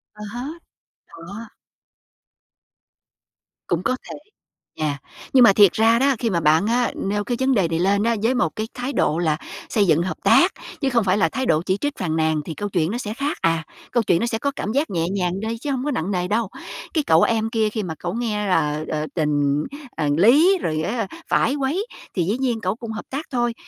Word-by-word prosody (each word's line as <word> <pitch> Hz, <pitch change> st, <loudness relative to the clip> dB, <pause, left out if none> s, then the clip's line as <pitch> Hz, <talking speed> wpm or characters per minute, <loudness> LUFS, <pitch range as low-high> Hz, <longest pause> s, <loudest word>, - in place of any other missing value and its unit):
À 210 Hz, -, -9 dB
há. 245 Hz, +1 st, -4 dB, 0.7 s
Đó. 200 Hz, +7 st, -10 dB, 2.2 s
Cũng 175 Hz, +1 st, 0 dB
có 255 Hz, -, +1 dB
thể. -, -, -6 dB, 0.6 s
Yeah, 150 Hz, -2 st, 0 dB, 0.4 s
nhưng 255 Hz, -2 st, +7 dB
mà 200 Hz, -, +7 dB
thiệt 200 Hz, -2 st, +6 dB
ra 225 Hz, +1 st, +4 dB
đó, 275 Hz, 0 st, +3 dB
khi 235 Hz, -, 0 dB
mà 175 Hz, -5 st, +1 dB
bạn 155 Hz, +3 st, +3 dB
á, 240 Hz, +1 st, +1 dB
nêu 205 Hz, +1 st, -2 dB
cái 240 Hz, +2 st, -2 dB
vấn 265 Hz, 0 st, +2 dB
đề 195 Hz, -8 st, +2 dB
này 165 Hz, 0 st, -1 dB
lên 200 Hz, +3 st, +2 dB
á, 230 Hz, +1 st, +2 dB
với 250 Hz, +3 st, +2 dB
một 165 Hz, -10 st, 0 dB
cái 215 Hz, 0 st, -3 dB
thái 255 Hz, +3 st, -4 dB
độ 160 Hz, +3 st, +1 dB
là 155 Hz, -3 st, +1 dB, 0.3 s
xây 205 Hz, -4 st, +2 dB
dựng 160 Hz, +1 st, +3 dB
hợp 185 Hz, -, -3 dB
tác, -, -, +5 dB, 0.3 s
chứ 275 Hz, -, +1 dB
không 240 Hz, -3 st, +2 dB
phải 190 Hz, 0 st, +2 dB
là 165 Hz, -6 st, +3 dB
thái 260 Hz, +9 st, -2 dB
độ 155 Hz, -7 st, +2 dB
chỉ 190 Hz, 0 st, +1 dB
trích, 290 Hz, +5 st, -3 dB
phàn 165 Hz, -4 st, -2 dB
nàn 160 Hz, -1 st, +1 dB
thì 160 Hz, -, -5 dB
câu 205 Hz, +6 st, -4 dB
chuyện 175 Hz, -2 st, 0 dB
nó 235 Hz, -, -2 dB
sẽ 215 Hz, -3 st, -4 dB
khác 280 Hz, +5 st, -2 dB
à. 165 Hz, -1 st, +1 dB, 0.3 s
Câu 240 Hz, 0 st, +2 dB
chuyện 170 Hz, -5 st, +2 dB
nó -, -, 0 dB
sẽ 230 Hz, -1 st, -1 dB
có 280 Hz, +3 st, -1 dB
cảm 210 Hz, -, -3 dB
giác 285 Hz, +5 st, 0 dB
nhẹ 170 Hz, -4 st, -1 dB
nhàng 185 Hz, -1 st, -1 dB
đi 225 Hz, +2 st, -3 dB
chứ 285 Hz, +4 st, -4 dB
hông 260 Hz, +1 st, -2 dB
có 295 Hz, -, 0 dB
nặng 185 Hz, -, -2 dB
nề 180 Hz, -1 st, -1 dB
đâu. 215 Hz, +2 st, 0 dB, 0.5 s
Cái 310 Hz, -, +1 dB
cậu 160 Hz, +1 st, +5 dB
em 225 Hz, -1 st, +2 dB
kia 220 Hz, -2 st, +1 dB
khi 215 Hz, -1 st, -3 dB
mà 165 Hz, -3 st, -4 dB
cậu 175 Hz, 0 st, -3 dB
nghe 215 Hz, -3 st, -2 dB
là, 150 Hz, -4 st, +1 dB
ờ, 155 Hz, 0 st, -1 dB
tình, 145 Hz, -2 st, +1 dB, 0.3 s
ờ, 150 Hz, -2 st, 0 dB
lý, 295 Hz, -, +6 dB
rồi 155 Hz, -1 st, -1 dB
á 210 Hz, +3 st, -2 dB, 0.2 s
phải 270 Hz, -, +2 dB
quấy, 295 Hz, -, -1 dB, 0.3 s
thì 175 Hz, -, +1 dB
dĩ 205 Hz, +8 st, 0 dB
nhiên 245 Hz, -4 st, -1 dB
cẩu 185 Hz, +2 st, -1 dB
cũng 230 Hz, -1 st, -7 dB
hợp 220 Hz, -, -6 dB
tác 285 Hz, +4 st, -4 dB
thôi. 240 Hz, -2 st, 0 dB
210 Hz, 230 wpm, -22 LUFS, 170-240 Hz, 2.2 s, nhưng